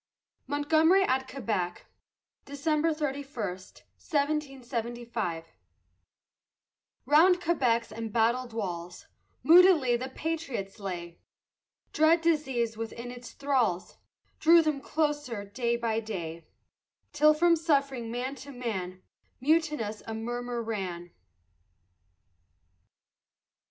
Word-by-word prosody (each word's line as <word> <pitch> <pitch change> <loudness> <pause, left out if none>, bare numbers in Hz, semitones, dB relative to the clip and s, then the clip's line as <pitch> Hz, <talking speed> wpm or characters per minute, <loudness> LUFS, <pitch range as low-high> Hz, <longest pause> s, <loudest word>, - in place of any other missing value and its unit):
MONTGOMERY 315 +6 +3
AT 265 -6 0
QUEBEC 205 -10 -3 0.6
[December 305 +3 0
31, 285 -2 -4
1775] 240 - -4 1.6
Round 350 +5 +5
Quebec's 250 -10 +1
embattled 230 +3 0
walls 180 -5 -5 0.4
Moodily 330 -7 +6
the 255 +2 -4
patriots 270 -10 -4
lay; 175 -4 -6 0.7
Dread 320 +2 +4
disease 270 -9 0
within 230 +2 -6
its 245 -1 -10
thralls 255 -11 -1 0.4
Drew 335 +1 +6
them 305 -3 -1
closer 295 -9 -2
day 235 +3 -1
by 230 -2 -1
day; 170 -7 -6 0.7
Till 305 +1 +5
from 340 +2 +4
suffering 275 -7 0
man 250 +3 -3
to 280 - -11
man, 190 -8 -5 0.4
Mutinous, 300 -7 0
a 225 - -4
murmur 240 +1 -4
ran. 185 -6 -4
245 Hz, 90 wpm, -29 LUFS, 220-300 Hz, 1.6 s, Moodily